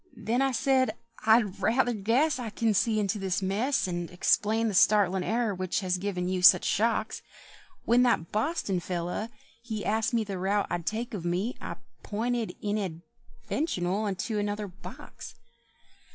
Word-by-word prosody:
Then 240 +4 0
I 270 0 +2
said, 260 +1 +2 0.3
"I 225 +2 +7
rather 235 +5 0
guess 240 +8 +1
I 235 -3 -4
can 220 +1 0
see 215 +2 +2
into 205 0 -1
this 195 0 -1
mess, 210 +7 0
And 175 -1 -3
explain 215 +5 +1
the 215 - -2
startlin' 195 -1 +4
error 225 0 0
which 185 +2 -2
has 185 -1 -1
given 180 -2 -2
you 185 0 -1
such 180 - +7
shocks. 220 +1 0 0.6
When 240 +2 +4
that 235 -10 +1
Boston 215 - -1
fellow, 175 +5 -3 0.3
he 220 -3 -5
Asked 220 +2 0
the 195 -2 -5
route 200 +2 +1
I'd 175 -1 -3
take 230 +2 -3
of 195 -5 -4
me, 180 +8 -1
I - - -5 0.3
pinted, 230 +2 -2
inadvertional, 205 - -3
unto 205 +2 -2
another 205 0 -2
box." 185 +1 -11
210 Hz, 150 wpm, -28 LUFS, 185-230 Hz, 0.6 s, I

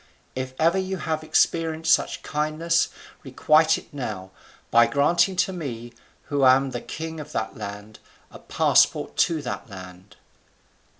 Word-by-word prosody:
If 130 0 -5
ever 165 +4 +3
you 190 0 -3
have 155 -1 -3
experienced 160 0 +1
such - - -1
kindness, 155 +3 0 0.4
requite 155 +4 +3
it - - -14
now, 105 -9 -6 0.4
by 115 0 +6
granting 170 +9 +2
to 190 +1 0
me, 120 -9 -6 0.3
who 145 -1 -1
am 130 +1 +4
the 120 - -5
king 160 0 -7
of 150 0 -9
that 110 0 -3
land, 105 +2 -8 0.3
a - - -12
passport - - +2
to 160 -3 +1
that 130 - -6
land." 90 -1 -12
145 Hz, 140 wpm, -24 LUFS, 120-160 Hz, 0.4 s, by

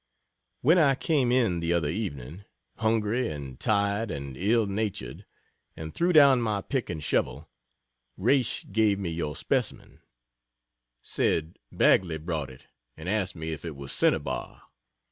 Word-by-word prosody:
When 165 +7 +5
I 140 -4 +4
came 135 -4 +1
in 115 -9 +2
the 85 +1 0
other 85 -4 +1
evening, 85 - -5 0.3
hungry 110 +2 +1
and 70 -4 -7
tired 100 +1 +1
and 70 -5 -5
ill 110 - +2
natured, 100 - -4 0.5
and 80 -1 -7
threw 175 +1 +1
down 140 -6 +7
my 105 -3 -1
pick 135 -4 -2
and 80 -4 -4
shovel, - - -1 0.7
Raish 120 +4 +1
gave 105 -1 +3
me 95 -4 -3
your 75 -3 -3
specimen - - -2 1.0
said 80 +1 -1
Bagley 85 -4 +3
brought 80 -3 -3
it, 65 - -15 0.3
and 80 +2 -8
asked 95 -4 0
me 80 0 -5
if 80 - -6
it 80 -3 -6
were 70 0 -9
cinnabar. - - -1
95 Hz, 145 wpm, -27 LUFS, 80-115 Hz, 1.0 s, down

